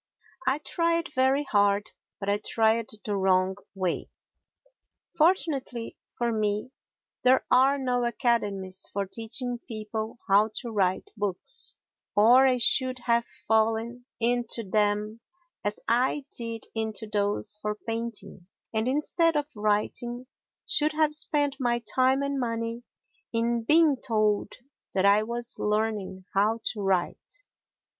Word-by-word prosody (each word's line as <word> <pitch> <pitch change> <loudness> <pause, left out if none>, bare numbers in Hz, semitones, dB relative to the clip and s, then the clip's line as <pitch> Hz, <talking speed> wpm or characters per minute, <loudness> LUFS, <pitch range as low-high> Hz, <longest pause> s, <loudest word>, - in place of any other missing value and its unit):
I 265 +2 +3
tried 335 +1 -1
very 265 +1 +2
hard, 205 -4 +2 0.3
but 195 - -5
I 205 +1 +2
tried 225 0 +2 0.2
the 210 - -1
wrong 190 -1 +2 0.2
way. 185 -3 -2 1.1
Fortunately 300 -8 +1 0.2
for 240 -1 0
me 215 +2 -1 0.5
there 255 +1 +4
are 270 +3 +5
no 250 -2 0
academies 205 -6 -1
for 200 0 -1
teaching 235 +4 -3
people 220 -1 -5
how 205 +2 +4
to 240 -3 -3
write 190 -3 0
books, 205 -4 0 0.4
or 245 +6 +7
I 255 -1 +3
should 255 +2 +3
have 235 0 +2
fallen 225 +2 0
into 235 -2 -1
them 210 +2 0 0.4
as 205 0 -2
I 255 +4 +1
did 230 -1 -4
into 220 -1 -3
those 205 0 -1
for 210 0 -2
painting 225 -5 -5 0.3
and, 220 +1 0
instead 300 +4 +1
of 295 0 -1
writing, 215 +4 -1 0.4
should 305 +1 +1
have 305 -1 +2
spent 290 -2 0
my 240 -2 +1 0.2
time 260 +2 +3
and 280 -1 -1
money 230 -1 -2 0.5
in 235 0 0
being 310 0 +5
told 215 -4 0 0.4
that 190 0 +2
I 200 +1 +6
was 235 +2 -5
learning 210 -3 -1
how 210 +3 +2
to 210 - -6
write. 195 - -2
230 Hz, 125 wpm, -27 LUFS, 210-255 Hz, 1.1 s, or